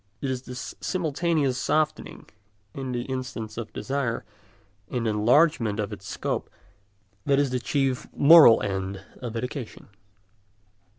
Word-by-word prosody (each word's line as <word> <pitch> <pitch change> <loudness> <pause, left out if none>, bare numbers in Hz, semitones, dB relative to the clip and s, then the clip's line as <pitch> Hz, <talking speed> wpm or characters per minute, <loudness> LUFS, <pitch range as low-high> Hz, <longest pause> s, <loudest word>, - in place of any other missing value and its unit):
It 135 - -2
is 130 -1 -3
this 125 -1 -7
simultaneous 155 -6 0
softening 155 +2 -1 0.5
in 135 -2 -5
the 120 0 -3
insistence 125 -4 -5
of 115 -2 -6
desire 125 +1 -3 0.6
and 120 -2 -2
enlargement 115 +1 +3
of 105 - -2
its - - -10
scope - - -3 0.8
that 140 - +4
is 140 -2 +1
the 125 - 0
chief 135 +1 -1
moral 150 -5 +8
end 95 -1 -4 0.2
of 120 -2 -5
education. 125 -2 -6
125 Hz, 125 wpm, -26 LUFS, 115-140 Hz, 0.8 s, moral